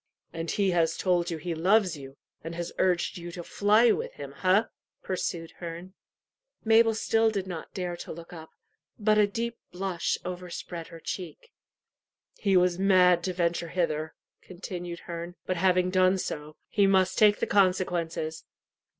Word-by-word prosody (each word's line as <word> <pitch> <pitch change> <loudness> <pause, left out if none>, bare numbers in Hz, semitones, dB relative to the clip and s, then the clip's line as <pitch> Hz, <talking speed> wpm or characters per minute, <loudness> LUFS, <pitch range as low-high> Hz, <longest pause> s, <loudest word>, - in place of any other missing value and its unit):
"And 165 0 -4
he 200 -2 +1
has 165 -2 +1
told 175 -2 +1
you 165 - -3
he 170 +2 -4
loves 185 +2 +3
you, 135 -1 -11 0.3
and 165 +1 -6
has 175 0 -4
urged 180 -1 +1
you 175 0 -7
to 175 - -6
fly 215 +6 +4
with - - -2
him 140 -1 -8
ha?" 190 +8 +2 0.3
pursued 170 -3 -3
Herne. 175 +2 -7 0.7
Mabel 225 0 +5
still 225 0 +2
did 200 -3 -2
not 175 -4 -7
dare 180 -2 -3
to - - -8
look 170 +2 -10
up, 160 -2 -10 0.5
but 215 -1 +3
a 210 - +5
deep 235 +3 -4
blush 180 -2 -1
overspread 175 -2 -6
her 165 -2 -11
cheek. 180 - -7 0.9
"He 195 -3 +3
was 180 0 +2
mad 185 -2 +5
to 185 - -1
venture 170 -1 0
hither," 160 -3 -1 0.3
continued 175 -1 -7
Herne; 170 0 -7
"but 185 - -1
having 185 0 +2
done 185 0 +4
so, 150 -4 -5
he 200 -2 +3
must 190 -1 +3
take 210 -1 +6
the - - 0
consequences." 175 -5 0
180 Hz, 160 wpm, -28 LUFS, 170-195 Hz, 0.9 s, take